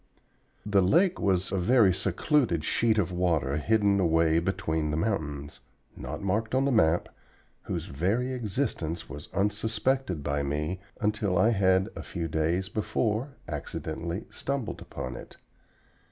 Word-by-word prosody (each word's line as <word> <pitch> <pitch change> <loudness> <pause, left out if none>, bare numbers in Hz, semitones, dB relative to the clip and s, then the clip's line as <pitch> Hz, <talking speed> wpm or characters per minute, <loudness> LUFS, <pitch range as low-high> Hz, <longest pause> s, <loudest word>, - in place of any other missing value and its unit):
The 100 -1 +3
lake 170 - +3
was 95 -2 +1
a 95 - 0
very 105 0 +5
secluded 100 - +1
sheet 115 -1 +2
of 95 -4 +1
water 85 -6 +1
hidden 100 +3 +2
away 80 -2 +3
between 80 -3 -1
the 75 - -1
mountains, 75 -7 -2 0.4
not - - -6
marked 110 +5 0
on 135 +1 +3
the 140 - +2
map, 85 -7 +3 0.5
whose - - -4
very 105 - -1
existence 100 - -2
was 75 +1 -9
unsuspected 105 - 0
by 70 0 0
me 75 +6 -2 0.2
until 105 -4 0
I 110 - +5
had 95 -2 +3
a - - -5
few 85 -3 -4
days 80 +4 0
before 110 +5 -1
accidentally 85 +4 -4
stumbled 140 -4 -3
upon 65 -1 -6
it. - - -11
95 Hz, 140 wpm, -28 LUFS, 80-110 Hz, 0.5 s, very